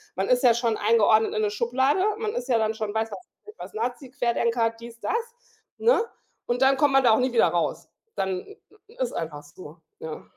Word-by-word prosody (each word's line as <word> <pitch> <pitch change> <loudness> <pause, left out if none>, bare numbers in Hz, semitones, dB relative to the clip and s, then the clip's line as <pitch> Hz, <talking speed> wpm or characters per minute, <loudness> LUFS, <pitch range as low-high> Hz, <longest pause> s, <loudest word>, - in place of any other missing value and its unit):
man 190 +1 -2
ist 250 0 +3
ja 245 -2 +6
schon 230 -2 0
eingeordnet 220 -1 +3
in 215 - 0
'ne 210 - 0
Schublade. 260 - +1 0.2
Man 435 -2 -2
ist 245 +1 -4
ja 240 - +4
dann 220 -1 0
schon 215 -2 -4
weiß 220 0 -1
was 200 - -6 0.3
ich 425 - -10
was, - - -9
Nazi, 245 +4 -4
Querdenker, 235 -2 0
dies, 230 0 -11
das, - - -2 0.6
ne? 465 -1 +3 0.5
Und 240 +1 -1
dann 270 0 +4
kommt 285 0 +3
man 270 0 +5
da 240 - +5
auch 220 - +4
nie 255 -1 0
wieder 230 - +5
raus. 170 0 -2 0.3
Dann 190 -1 -3 0.4
i 455 - -18
ist - - -1
einfach 150 -3 -5
so, 150 +1 -13 0.2
ja. 160 -1 -7
230 Hz, 215 wpm, -25 LUFS, 215-255 Hz, 0.6 s, ja